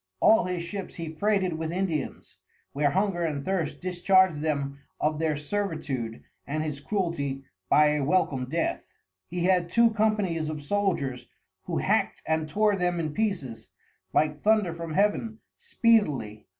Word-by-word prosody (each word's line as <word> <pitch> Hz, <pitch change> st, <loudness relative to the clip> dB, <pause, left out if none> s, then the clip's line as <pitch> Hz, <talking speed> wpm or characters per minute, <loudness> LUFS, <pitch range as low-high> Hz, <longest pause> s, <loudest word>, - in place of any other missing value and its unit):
All 220 Hz, -4 st, +5 dB
his 180 Hz, -2 st, -2 dB
Ships 195 Hz, +2 st, -6 dB
he 165 Hz, -2 st, -6 dB
freighted 195 Hz, +1 st, +1 dB
with 160 Hz, 0 st, -3 dB
Indians, 170 Hz, -6 st, -3 dB, 0.4 s
where 145 Hz, +1 st, +2 dB
Hunger 190 Hz, +1 st, 0 dB
and 150 Hz, -4 st, -2 dB
Thirst 185 Hz, -5 st, -1 dB
discharg'd 185 Hz, -2 st, +3 dB
them 140 Hz, -3 st, -2 dB, 0.2 s
of 155 Hz, 0 st, 0 dB
their 155 Hz, -2 st, 0 dB
Servitude 145 Hz, -, -3 dB, 0.2 s
and 155 Hz, +2 st, -1 dB
his 150 Hz, -3 st, -4 dB
Cruelty 145 Hz, -6 st, -2 dB, 0.3 s
by 150 Hz, 0 st, +6 dB
a 150 Hz, -1 st, 0 dB
welcome 145 Hz, -5 st, +1 dB
Death. 165 Hz, +3 st, -2 dB, 0.3 s
He 175 Hz, 0 st, -3 dB
had 180 Hz, -2 st, +2 dB
two 235 Hz, +4 st, +4 dB
Companies 210 Hz, -8 st, 0 dB
of 150 Hz, -2 st, -5 dB
Soldiers 145 Hz, -8 st, -1 dB, 0.4 s
who -, -, -2 dB
hackt -, -, 0 dB
and 160 Hz, 0 st, 0 dB
tore 210 Hz, +5 st, +2 dB
them 180 Hz, -2 st, 0 dB
in 155 Hz, -2 st, -2 dB
pieces, 175 Hz, -, -2 dB, 0.4 s
like 150 Hz, -1 st, +1 dB
Thunder 210 Hz, -5 st, +3 dB
from 165 Hz, -2 st, -6 dB
Heaven 210 Hz, +2 st, +1 dB, 0.2 s
speedily. 180 Hz, -, +1 dB
165 Hz, 150 wpm, -27 LUFS, 150-195 Hz, 0.4 s, by